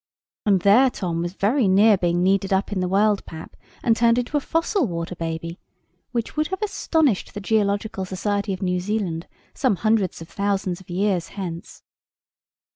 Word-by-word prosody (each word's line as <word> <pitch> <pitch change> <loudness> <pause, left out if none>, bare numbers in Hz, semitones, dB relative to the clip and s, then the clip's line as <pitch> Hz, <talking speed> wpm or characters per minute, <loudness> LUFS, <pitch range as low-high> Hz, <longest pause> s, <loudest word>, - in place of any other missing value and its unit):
And 195 -3 +4
there 220 +8 +6
Tom 175 -8 -3
was 175 +2 -4
very 220 +4 +2
near 205 +3 +6
being 175 -1 0
kneaded 195 +1 +2
up 190 +2 +1
in 200 - -1
the 180 - 0
world 205 +2 +2
pap, 160 -1 -9 0.3
and 230 - +3
turned 230 0 +3
into 245 +4 -2
a - - +4
fossil 330 +7 0
water 170 0 -4
baby; 165 +1 -5 0.5
which 235 -2 -3
would 305 0 +1
have 380 +3 -4
astonished 320 - 0
the - - -3
Geological 205 -1 0
Society 200 +2 -2
of 190 +1 -4
New 180 -1 0
Zealand 180 -4 -2 0.3
some 255 -7 +1
hundreds 215 -2 +1
of 165 - -9
thousands 195 -2 -2
of 185 - -19
years 185 -1 0
hence. 170 -4 -6
200 Hz, 175 wpm, -23 LUFS, 180-220 Hz, 0.5 s, there